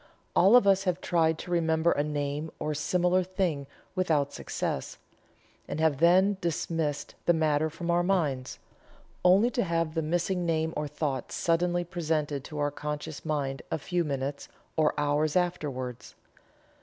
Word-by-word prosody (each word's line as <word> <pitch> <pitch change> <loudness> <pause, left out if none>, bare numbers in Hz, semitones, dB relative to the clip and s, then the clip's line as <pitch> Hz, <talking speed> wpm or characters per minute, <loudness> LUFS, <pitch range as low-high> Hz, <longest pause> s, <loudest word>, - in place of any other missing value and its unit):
All 195 +6 +6
of 245 - +7
us 195 0 +4
have 180 -1 0
tried 165 -3 +2
to 175 - -8
remember 165 -1 +2
a 145 - +1
name 145 +1 -2
or 150 0 -2
similar 180 +5 +2
thing 180 -6 -2 0.3
without 155 -7 +1
success, 65 - -4 0.7
and - - -4
have 155 -4 +2
then 185 +4 +5
dismissed 160 -3 -2
the 175 - +5
matter 155 -1 +2
from 170 +2 -3
our 175 0 +3
minds, 150 -9 0 0.7
only 195 +7 +5
to 240 - 0
have 165 -3 -1
the 165 - 0
missing 175 +3 0
name 160 -1 0
or 150 0 -2
thought 145 -3 -3
suddenly 175 +1 +1
presented 155 -5 -2
to 150 - -8
our 145 0 0
conscious 150 0 -5
mind 140 -4 -2
a - - -1
few 175 +4 -1
minutes, 140 -1 -3 0.3
or 155 -1 +2
hours, 145 +1 +1
afterwards. 145 -9 -2
160 Hz, 155 wpm, -28 LUFS, 145-175 Hz, 0.7 s, of